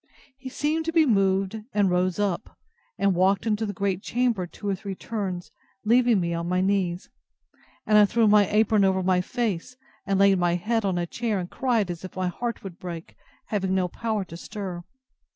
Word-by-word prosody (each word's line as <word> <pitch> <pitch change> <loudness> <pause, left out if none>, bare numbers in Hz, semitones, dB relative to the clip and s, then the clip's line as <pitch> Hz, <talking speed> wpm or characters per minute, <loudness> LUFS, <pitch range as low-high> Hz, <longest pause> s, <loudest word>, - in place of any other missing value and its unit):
He 265 -1 -7
seemed 305 +4 -1
to 330 - -1
be 325 -1 +4
moved, 195 -2 +1
and 205 -3 +2
rose 180 0 +1
up, 205 -1 -2 0.4
and 200 -1 +2
walked 190 +4 +2
into 220 0 0
the - - -2
great 195 -1 -1
chamber 235 -7 0
two 205 - -9
or 200 - +1
three 195 0 -5
turns, 190 -5 -4 0.3
leaving 240 -1 +4
me 170 -1 -1
on 170 +1 -3
my 180 0 +1
knees; 185 -2 0 0.8
and 215 -1 +5
I 210 - +7
threw 225 +2 +2
my 205 -1 +5
apron 215 -1 +3
over 190 -1 +2
my 180 0 +3
face, 235 +2 -3 0.3
and 195 -1 +1
laid 195 -1 +5
my 175 -1 +2
head 225 +5 0
on 190 -2 0
a 175 - 0
chair, 225 +4 -2
and 180 -1 -5
cried 230 -8 0
as 170 0 -8
if 185 - -8
my 185 -1 -1
heart 235 +6 -4
would 185 -3 -9
break, 170 -2 -7 0.3
having 190 -3 0
no 185 -1 +1
power 215 +1 -3
to 165 - -10
stir. 185 -3 -6
195 Hz, 200 wpm, -25 LUFS, 180-220 Hz, 0.8 s, I